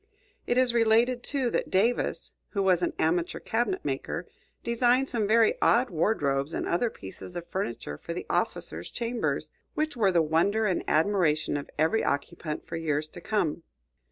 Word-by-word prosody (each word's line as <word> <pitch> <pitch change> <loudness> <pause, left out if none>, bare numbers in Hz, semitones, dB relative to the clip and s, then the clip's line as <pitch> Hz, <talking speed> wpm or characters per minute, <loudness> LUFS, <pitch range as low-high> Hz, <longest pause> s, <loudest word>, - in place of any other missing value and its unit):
It 245 - +1
is 255 -2 +4
related, 235 +2 +3
too, 260 -2 -1
that - - -1
Davis, 225 +6 +1 0.2
who 200 -2 +1
was 185 -2 +3
an 175 - 0
amateur 170 +2 0
cabinet 245 +12 -1
maker, - - -3 0.4
designed 245 +3 +2
some 225 -4 0
very 225 +1 +5
odd 245 -1 +4
wardrobes 150 -5 0
and - - -2
other 200 +8 +1
pieces 100 - -10
of 175 -1 -5
furniture 120 - -4
for - - -7
the - - -4
officers' 80 +2 -2
chambers, 235 0 -2 0.2
which 310 -2 -1
were 205 -5 +3
the 170 -2 +3
wonder 175 +8 +2
and 185 -4 0
admiration 155 -3 +2
of 145 - -4
every 160 +9 +2
occupant 150 +2 -3
for 165 - -5
years 155 -2 -1
to 175 - -10
come. 170 -5 -1
190 Hz, 165 wpm, -28 LUFS, 160-235 Hz, 0.4 s, very